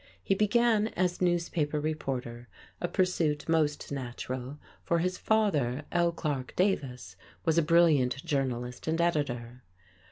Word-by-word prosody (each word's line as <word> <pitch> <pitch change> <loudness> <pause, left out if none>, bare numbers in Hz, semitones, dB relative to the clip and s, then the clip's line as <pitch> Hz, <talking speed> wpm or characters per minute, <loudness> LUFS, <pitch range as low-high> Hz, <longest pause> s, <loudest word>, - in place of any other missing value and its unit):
He - - +2
began 215 +1 +3
as 180 0 0
newspaper 170 -4 0
reporter, 130 -6 -4 0.3
a 175 - 0
pursuit 170 -5 0
most 155 -3 +1
natural, 130 0 -5 0.3
for 170 - +1
his 180 +2 -1
father, 155 - +1
L. 170 0 +2
Clarke 145 -6 -3
Davis, 135 - -1 0.3
was 165 0 +3
a - - +4
brilliant 150 -6 +3
journalist 125 -3 -2
and 160 +1 0
editor. 125 -8 -1
155 Hz, 125 wpm, -29 LUFS, 130-175 Hz, 0.3 s, a